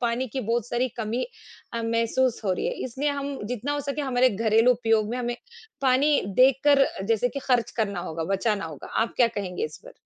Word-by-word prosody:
पानी 240 +2 0
की 260 +4 -3
बहुत 235 +1 -1
सारी 250 +2 0
कमी 230 - -2 0.5
अ, 230 0 -2
महसूस 230 +2 +1
हो 190 - +2
रही 180 - -2
है। - - -1
इसलिए 265 +4 -2
हम 280 -1 -4
जितना 250 +4 -3
हो 290 - -1
सके 280 +1 -3
हमारे 255 -2 +3
घरेलू 225 +3 +3
उपयोग 225 -3 +1
में 245 - -2
हमें 240 -1 -2 0.5
पानी 275 +3 +4 0.2
देखकर 275 +2 +5 0.2
जैसे 230 +2 +2
कि 275 - -5
खर्च 245 -3 +2
करना 200 -5 -1
होगा, 160 -1 -4
बचाना 210 -1 0
होगा। 155 -4 -8 0.2
आप 230 - -3
क्या 245 - +5
कहेंगे 185 -3 -3
इस 155 - -6
पर? - - -12
240 Hz, 205 wpm, -25 LUFS, 220-260 Hz, 0.5 s, देखकर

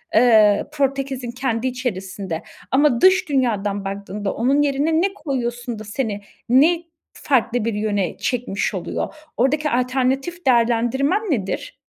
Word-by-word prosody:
eee, 220 -3 +5
Portekiz'in 275 -3 -1
kendi 245 -1 -2
içerisinde 195 -8 -4 0.3
ama 265 -2 +3
dış 375 -1 +5
dünyadan 210 -7 0
baktığında, 200 +1 -4
onun 270 +5 +2
yerine 290 +3 +1
ne 390 +1 0
koyuyorsun 245 - -4
da - - -7
seni 210 -1 -3 0.3
ne 320 +7 +4 0.3
farklı 245 -4 0
bir 230 - 0
yöne 205 -3 -1
çekmiş 245 -5 -2
oluyor? - - -3 0.2
Oradaki 300 +5 +1
alternatif 265 +6 -1
değerlendirmen 245 - +2
nedir? 250 - -3
250 Hz, 120 wpm, -21 LUFS, 215-275 Hz, 0.3 s, eee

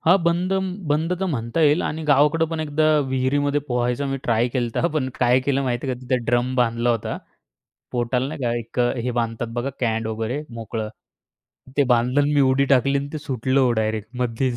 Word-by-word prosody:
हां. 175 +4 +5
बंदन 185 +3 +1 0.2
बंद 160 +4 +1
तर 190 - 0
म्हणता 130 -1 -2
येईल 150 +1 +4
आणि 160 +1 -3
गावाकडे 150 +3 +4
पण 165 -1 -2
एकदा 155 0 0 0.2
विहिरीमध्ये 140 +3 +1
पोहायचं 125 +2 0
मी 135 - -1
ट्राय 115 +1 +2
केलंत. 120 -2 -2
हां, 170 - +2
पण 140 -4 0
काय 125 +1 +4
केलं, 140 +1 0
माहिती 125 +1 -2
आहे 130 - -1
का? 125 - -13
तिथे 125 0 0
ड्रम 120 +1 +1
बांधला 120 -1 +2
होता. 115 -2 -2 0.8
पोटाला, 125 +1 0
नाही 155 +2 -6
का? 120 -1 +1
एक 115 +2 -4 0.2
हे 125 - 0
बांधतात 115 +1 -3
बघा 125 +3 -1
कँड 115 -2 0
वगैरे 115 +6 -3
मोकळं, 110 -1 -4 0.9
ते 145 - +4
बांधलं 125 +4 +2
आणि 145 - +1
मी 145 - +4
उडी 135 0 +3
टाकली 140 +1 +3
आणि 140 +1 -4
ते 155 - -3
सुटलं 135 -2 0
हो 125 -2 +3
डायरेक्ट 110 -1 -1
मध्येच. 125 +1 0
130 Hz, 200 wpm, -22 LUFS, 120-145 Hz, 0.9 s, हां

